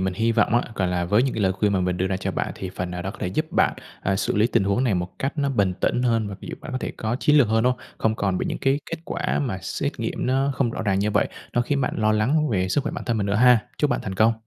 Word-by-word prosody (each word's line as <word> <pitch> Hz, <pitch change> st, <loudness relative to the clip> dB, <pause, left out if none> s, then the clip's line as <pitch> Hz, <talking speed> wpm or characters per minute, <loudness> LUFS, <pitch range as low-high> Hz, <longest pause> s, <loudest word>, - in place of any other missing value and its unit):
mình 95 Hz, -1 st, -1 dB
hi 115 Hz, +3 st, +1 dB
vọng -, -, +2 dB
á, 120 Hz, -, +4 dB
gọi 95 Hz, -2 st, 0 dB
là, 90 Hz, -1 st, 0 dB
với 105 Hz, +7 st, +3 dB
những 135 Hz, -, -1 dB
cái 110 Hz, -, -1 dB
lời 95 Hz, -1 st, +3 dB
khuyên 100 Hz, +2 st, +1 dB
mà 95 Hz, -, +1 dB
mình 90 Hz, 0 st, 0 dB
đưa 95 Hz, -, 0 dB
ra 95 Hz, -1 st, -1 dB
cho 95 Hz, -, -3 dB
bạn -, -, -2 dB
thì 95 Hz, -1 st, -6 dB
phần 90 Hz, -1 st, -4 dB
nào 90 Hz, 0 st, -4 dB
đó 95 Hz, -, -3 dB
có -, -, -12 dB
thể -, -, -1 dB
giúp 155 Hz, -, -1 dB
bạn, -, -, +3 dB, 0.3 s
à, 95 Hz, 0 st, 0 dB
xử -, -, -1 dB
lý 105 Hz, +2 st, +4 dB
tình 100 Hz, -, +1 dB
huống 100 Hz, +6 st, +1 dB
này 110 Hz, -6 st, +2 dB
một 90 Hz, 0 st, -4 dB
cách 140 Hz, +4 st, -3 dB
nó 140 Hz, -1 st, +1 dB
bình 100 Hz, -8 st, +1 dB
tĩnh 125 Hz, -, +1 dB
hơn, 115 Hz, -4 st, +1 dB
và 100 Hz, -, -6 dB
ví -, -, -9 dB
dụ -, -, -4 dB
bạn 145 Hz, -, -8 dB
có 130 Hz, -, -1 dB
thể -, -, -4 dB
có 110 Hz, +2 st, -2 dB
chiến 150 Hz, 0 st, +4 dB
lược 125 Hz, -7 st, +5 dB
hơn, 110 Hz, 0 st, +2 dB
đúng 125 Hz, -, +4 dB
hông? -, -, -11 dB, 0.2 s
Không 110 Hz, -1 st, +1 dB
còn 95 Hz, -2 st, 0 dB
bị -, -, -2 dB
những -, -, -3 dB
cái 135 Hz, +1 st, +2 dB
kết 165 Hz, -, -3 dB
quả 180 Hz, +1 st, -1 dB
mà 105 Hz, -8 st, -2 dB
xét -, -, -3 dB
nghiệm -, -, -2 dB
nó 135 Hz, +2 st, +1 dB
không 125 Hz, -4 st, +1 dB
rõ 110 Hz, -, -4 dB
ràng 95 Hz, -3 st, +1 dB
như 105 Hz, +1 st, +1 dB
vậy, -, -, +2 dB, 0.2 s
nó 120 Hz, -, +2 dB
khiến 140 Hz, +2 st, 0 dB
bạn -, -, -1 dB
lo 110 Hz, 0 st, +2 dB
lắng 140 Hz, +9 st, +2 dB
về 95 Hz, -4 st, 0 dB
sức 145 Hz, -, +2 dB
khỏe -, -, -2 dB
bản -, -, -5 dB
thân 120 Hz, -2 st, 0 dB
mình 100 Hz, -1 st, 0 dB
nữa 100 Hz, -, 0 dB
ha. 125 Hz, +1 st, +5 dB
Chúc 150 Hz, -3 st, +2 dB
bạn -, -, 0 dB
thành 95 Hz, -2 st, -4 dB
công. 110 Hz, +4 st, +4 dB
110 Hz, 340 wpm, -24 LUFS, 95-125 Hz, 0.3 s, lược